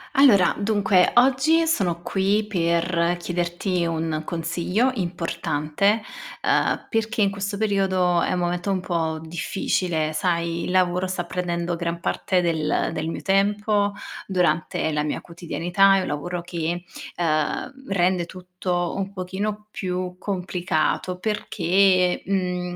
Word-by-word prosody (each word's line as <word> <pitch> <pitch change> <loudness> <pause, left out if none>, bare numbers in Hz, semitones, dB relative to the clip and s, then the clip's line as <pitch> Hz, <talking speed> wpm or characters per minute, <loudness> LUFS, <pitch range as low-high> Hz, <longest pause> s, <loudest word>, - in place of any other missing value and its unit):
Allora, 215 -10 +6
dunque: 200 -3 +3
oggi 270 +6 +4
sono 180 - 0
qui 200 +4 +1
per 170 -2 +1
chiederti 175 +1 -1
un 160 -1 -2
consiglio 175 +9 0
importante, 175 - 0 0.4
uhm, - - +1
perché 225 -1 0
in 200 - +2
questo 200 0 -4
periodo 190 -4 +2
è - - 0
un - - 0
momento 175 +2 -1
un 190 - +1
po' 165 -3 -2
difficile. 160 -1 -1
Sai, 170 0 -1
il - - -4
lavoro 180 0 +2
sta 185 -1 -2
prendendo 175 -1 -2
gran 170 0 -3
parte 185 +1 0
del 160 -3 0
del 155 -1 -3
mio 165 - -5
tempo 205 +1 +2 0.3
durante 170 -4 0
la 150 -1 0
mia 150 0 -2
quotidianità. 175 +3 +2
È - - +1
un - - -4
lavoro 170 +4 -3
che, 175 0 -3 0.3
ehm, 155 - 0
rende 180 -2 +1
tutto 180 -1 -3
un 195 0 -3
pochino 200 +3 -4
più 180 -2 -3
complicato, 180 -2 -1
perché, 185 -2 +2
mhmm, 180 -2 -2
180 Hz, 130 wpm, -23 LUFS, 170-195 Hz, 0.4 s, Allora